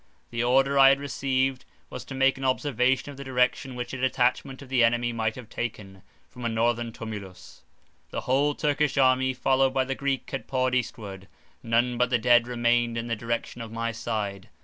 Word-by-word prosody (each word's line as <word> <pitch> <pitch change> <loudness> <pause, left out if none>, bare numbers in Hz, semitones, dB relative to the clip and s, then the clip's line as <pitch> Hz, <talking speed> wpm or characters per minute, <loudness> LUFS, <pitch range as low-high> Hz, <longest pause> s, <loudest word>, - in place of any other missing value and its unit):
The 115 0 -1
order 135 +3 +3
I 135 0 +9
had 135 0 +3
received, 135 -2 -1 0.3
was 125 - -6
to 135 - -8
make 135 0 +2
an - - -6
observation 130 0 +1
of 140 - -12
the 140 - -7
direction 130 0 0
which 125 +1 -5
a 130 - -5
detachment 130 +1 0
of - - -13
the 130 -2 +3
enemy 120 +1 +2
might 110 -1 -1
have 125 -3 -10
taken, 105 -5 -6 0.3
from 125 - -11
a 120 - 0
northern 115 +1 0
tumulus; 105 -6 -9 0.5
the - - -4
whole 140 +3 +1
Turkish 150 -1 0
army, 130 -1 +3
followed 130 +1 +2
by 130 -1 +2
the 135 - -2
Greek, 135 -1 -2
had 135 - -5
poured 130 -1 0
eastward; 105 -6 -3 0.3
none 120 +1 +1
but 125 0 +3
the 125 - +3
dead 120 +1 +4
remained 120 -1 +1
in 115 - -3
the 115 - 0
direction 115 +1 -4
of 115 -1 -7
my 115 0 -2
side. 105 -4 -4
125 Hz, 195 wpm, -26 LUFS, 115-135 Hz, 0.5 s, I